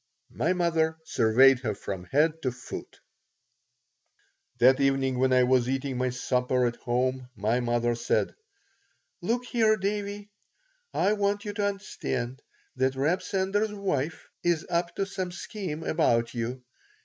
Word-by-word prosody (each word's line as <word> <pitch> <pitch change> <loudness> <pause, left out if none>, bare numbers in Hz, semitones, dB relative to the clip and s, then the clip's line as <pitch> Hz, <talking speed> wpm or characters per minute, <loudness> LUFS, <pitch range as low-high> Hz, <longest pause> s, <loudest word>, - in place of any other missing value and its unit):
My 170 +4 +1
mother 165 -3 +1
surveyed 130 +1 +5
her 110 -5 -2
from 95 -2 -6
head 155 - +2
to 130 - 0
foot 125 +1 -9 1.6
That 130 +2 +5
evening 135 -2 +1
when 130 0 +3
I 130 0 +5
was 125 -1 +3
eating 135 0 -2
my 130 0 +1
supper 125 0 0
at 120 -1 -1
home 125 +1 -1
my 110 +4 +1
mother 120 0 +1
said: 120 - 0 0.9
"Look 245 +2 -1
here, 220 -3 +3
Davie. 205 +1 -3 0.6
I 200 +3 +2
want 205 0 0
you 205 - -3
to 205 -1 0
understand 140 -10 -4 0.4
that 130 +1 +1
Reb 155 +8 +1
Sender's 200 +3 0
wife 170 -6 -2 0.2
is 170 -2 +1
up 170 0 0
to 195 - 0
some 190 -2 -4
scheme 175 -4 -5
about 120 -9 +1
you. 125 +2 -4
135 Hz, 140 wpm, -27 LUFS, 125-190 Hz, 1.6 s, surveyed